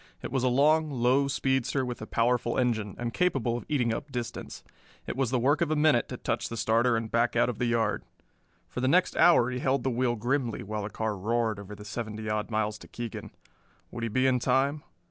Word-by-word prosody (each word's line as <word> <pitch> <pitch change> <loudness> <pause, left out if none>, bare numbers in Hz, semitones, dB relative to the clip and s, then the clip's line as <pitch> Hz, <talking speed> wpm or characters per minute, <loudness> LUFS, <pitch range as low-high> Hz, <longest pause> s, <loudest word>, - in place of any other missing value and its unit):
It - - -5
was 130 -1 0
a - - +3
long, 150 +5 +3
low 130 +1 +2
speedster 135 0 0
with 125 -2 -5
a 110 - -6
powerful 120 0 +1
engine, 110 -5 0
and 120 -1 -3
capable 135 -10 +1
of 120 - -6
eating 125 -6 +1
up 140 +5 -6
distance. 120 -2 -6 0.4
It - - -4
was 130 -2 0
the 130 - +1
work 140 +6 +2
of 170 - +2
a 155 - +1
minute 150 -5 +3
to - - -5
touch - - -2
the 115 - -5
starter 115 +2 +2
and 115 -1 -4
back 120 +1 +1
out 120 +1 +3
of 120 - -5
the 120 - +1
yard. 115 -1 0 0.6
For 125 - -5
the 130 - +1
next 180 +6 +3
hour 130 -8 +5
he 125 - -3
held 135 +2 +1
the 130 - 0
wheel 120 0 +1
grimly 120 0 -1
while 105 +1 -4
the 100 - -4
car 110 -1 -2
roared 110 +2 -1
over 100 +1 -9
the 105 +1 -11
seventy 110 0 -5
odd 105 +1 -1
miles 110 -1 -1
to - - -13
Keegan. 120 -2 -6 0.6
Would 115 - -6
he 115 - -1
be 130 +5 +1
in 130 -1 +3
time? 135 +4 +1
120 Hz, 230 wpm, -28 LUFS, 115-135 Hz, 0.6 s, hour